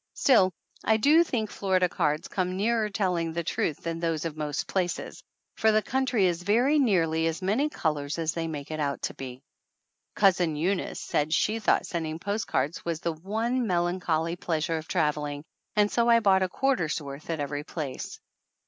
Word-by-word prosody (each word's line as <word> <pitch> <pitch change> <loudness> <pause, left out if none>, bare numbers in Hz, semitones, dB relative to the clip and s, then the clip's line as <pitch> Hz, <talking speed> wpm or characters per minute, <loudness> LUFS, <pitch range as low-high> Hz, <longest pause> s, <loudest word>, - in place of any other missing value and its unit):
Still 195 -9 +4 0.3
I 220 - +3
do 300 +9 +5
think 225 -9 -2
Florida 185 -2 +1
cards 150 -2 -1
come 185 -1 -2
nearer 220 +1 +1
telling 180 -5 0
the 170 +1 -2
truth 155 -1 -2
than 165 0 -3
those 165 -2 -1
of 160 -2 -3
most 150 -2 -2
places, 180 -3 -2 0.4
for 220 - +4
the 215 0 +3
country 255 -6 +1
is 175 -1 0
very 245 +10 +3
nearly 165 - +2
as 165 +3 -3
many 230 +11 +1
colors 150 - -2
as 165 -1 -1
they 165 -1 -2
make 150 -2 -6
it 155 - -4
out 140 -2 -2
to - - -2
be. 130 0 -8 0.7
Cousin 180 -5 +3
Eunice 180 +5 -1
said 150 +1 -1
she 215 +6 +1
thought 215 - +2
sending 160 -3 -3
post 205 +5 -3
cards 140 +5 -1
was 165 -1 -3
the 170 - -1
one 225 +9 -1
melancholy 175 -2 0
pleasure 165 -2 -1
of 160 0 -7
trav 155 -5 +2
eling, 145 -1 -4 0.3
and 210 -1 +3
so 235 0 +2
I 230 0 +7
bought 195 -4 +4
a 185 - +1
quarter's 195 - 0
worth 140 +1 -9
at 165 -2 -2
every 145 0 -3
place. 155 - -6
175 Hz, 185 wpm, -27 LUFS, 155-210 Hz, 0.7 s, I